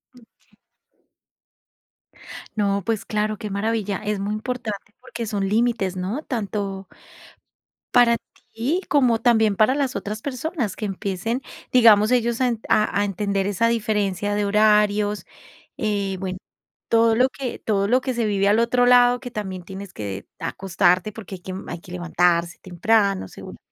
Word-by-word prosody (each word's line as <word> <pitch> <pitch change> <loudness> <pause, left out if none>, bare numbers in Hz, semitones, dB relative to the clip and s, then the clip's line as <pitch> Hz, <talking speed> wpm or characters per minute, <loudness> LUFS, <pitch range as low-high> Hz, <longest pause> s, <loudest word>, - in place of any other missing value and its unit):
Okey. 235 -2 -24 2.0
No, 200 -2 0
pues 225 -3 -1
claro, 215 0 -1
qué 210 - -6
maravilla. 205 0 -1
Es 210 -1 -1
muy 200 +2 -2
importante 215 -2 -5
porque 235 - -6
son 200 -3 -2
límites, 220 -3 +1
¿no?, 195 +11 -3
tanto 200 -5 -4 1.1
para 240 -1 +6 0.4
ti 275 +11 -1
como 250 -6 +3
también 220 -4 +3
para 215 +6 +3
las 275 -3 -1
otras 210 +2 -4
personas, 265 - -3
que 215 - -4
empiecen, 200 +5 -3 0.3
digamos, 220 -3 +6
ellos 235 -1 +1
a 255 - +4
en 235 -3 -1
a 210 -1 +2
a - - +2
entender 200 0 -1
esa 205 +3 +1
diferencia 205 -3 0
de 205 0 0
horarios, 210 0 +3 0.5
eh, 200 -3 -1
bueno, 185 -1 -4 0.5
todo 230 0 +4
lo 255 +3 +4
que 265 -2 -5
todo 200 -2 0
lo 250 +4 +3
que 260 0 -2
se 235 -2 -1
vive 200 -2 +1
al 210 +3 +4
otro 245 +1 +3
lado, 245 0 +5
que 245 -2 -8
también 190 -5 -5
tienes 190 +1 -9
que 100 -2 -6
acostarte 185 +1 +1
porque 205 -2 -8
hay 180 - -13
que 185 - -7
m 185 +1 -6
hay - - -5
que 175 - -14
levantarse 175 -1 +1
temprano, 195 - +1
seguramente. - - -11
210 Hz, 155 wpm, -23 LUFS, 195-235 Hz, 2.0 s, para